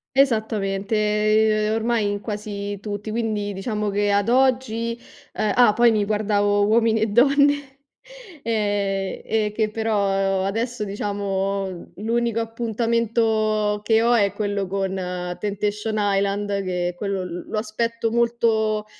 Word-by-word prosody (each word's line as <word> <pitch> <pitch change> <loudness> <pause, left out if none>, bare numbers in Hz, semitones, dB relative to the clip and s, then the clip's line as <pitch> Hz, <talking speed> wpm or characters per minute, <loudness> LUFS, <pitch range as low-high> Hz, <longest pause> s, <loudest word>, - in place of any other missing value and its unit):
Esattamente, 215 -2 +2
ormai 225 -1 +1
in 205 0 -4
quasi 205 -1 -5
tutti, 205 +1 -5
quindi 215 -2 -2
diciamo 210 +1 -2
che 205 +1 +1
ad 200 +2 +2
oggi, 245 -3 +1 0.4
uhm 215 -1 0
ah, 245 -4 +6
poi 235 +2 +5
mi 215 -2 +1
guardavo 205 -1 +1
Uomini 225 0 +3
e 220 - +2
donne 280 +4 +3 0.6
ehm, 205 -3 -1
e 215 -1 0
che 215 -1 0
però 195 -3 0
adesso, 225 +3 -2
diciamo, 195 -2 -3
l'unico 230 +2 0
appuntamento 225 -2 0
che 225 +1 +3
ho 240 +1 +4
è 200 -4 +3
quello 200 -2 -2
con 195 0 -2 0.5
Temptation 210 +1 -2
Island, 200 0 0
che 180 -1 -2
quello, 195 0 -3
l 180 -1 -6
lo - - -3
aspetto 230 +1 -2
molto, 225 -2 +1
215 Hz, 125 wpm, -22 LUFS, 200-225 Hz, 0.6 s, ah